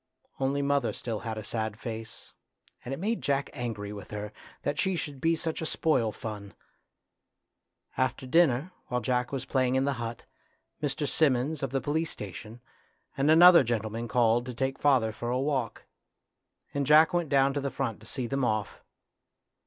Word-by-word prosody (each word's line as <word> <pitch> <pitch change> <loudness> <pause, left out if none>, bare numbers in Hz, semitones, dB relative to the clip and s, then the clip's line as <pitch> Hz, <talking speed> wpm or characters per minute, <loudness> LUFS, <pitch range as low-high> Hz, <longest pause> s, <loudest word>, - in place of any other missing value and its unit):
Only 135 +1 0
mother 140 -3 +1
still 115 -3 -4
had 110 0 -5
a 110 - -5
sad 110 -1 -3
face, 115 0 -7 0.5
and 125 - -6
it 135 - -3
made 220 +5 -1
Jack 140 0 0
angry 110 -6 -4
with 100 - -9
her, 105 0 -6 0.3
that 145 +1 -2
she 190 -1 +1
should 145 -5 -5
be 165 +1 +3
such 160 0 -3
a - - -2
spoil 130 -11 +1
fun. 105 -2 -7 1.4
After 130 0 0
dinner, 150 +2 +3 0.2
while 125 0 -1
Jack 125 -1 0
was 135 -2 -3
playing 130 -1 +1
in 130 +1 +2
the 140 - +1
hut, 115 0 -5 0.6
Mr. 145 0 -1
Simmons, 140 0 +1
of 135 - -1
the 135 +1 -1
police 160 +2 -1
station, 105 +4 -8 0.5
and 140 +1 +1
another 170 0 +9
gentleman 115 0 -2
called 120 0 +2
to 125 - -6
take 135 +2 -2
father 130 -6 +3
for 120 +2 -5
a 125 - +1
walk, 135 -4 -2 0.9
and 140 -2 -1
Jack 155 +4 +6
went 175 -3 0
down 135 -1 +3
to 145 - -1
the 140 - -1
front 130 -5 -3
to - - -16
see 130 -3 -3
them 135 +3 -1
off. 110 -5 -1
130 Hz, 175 wpm, -28 LUFS, 115-145 Hz, 1.4 s, another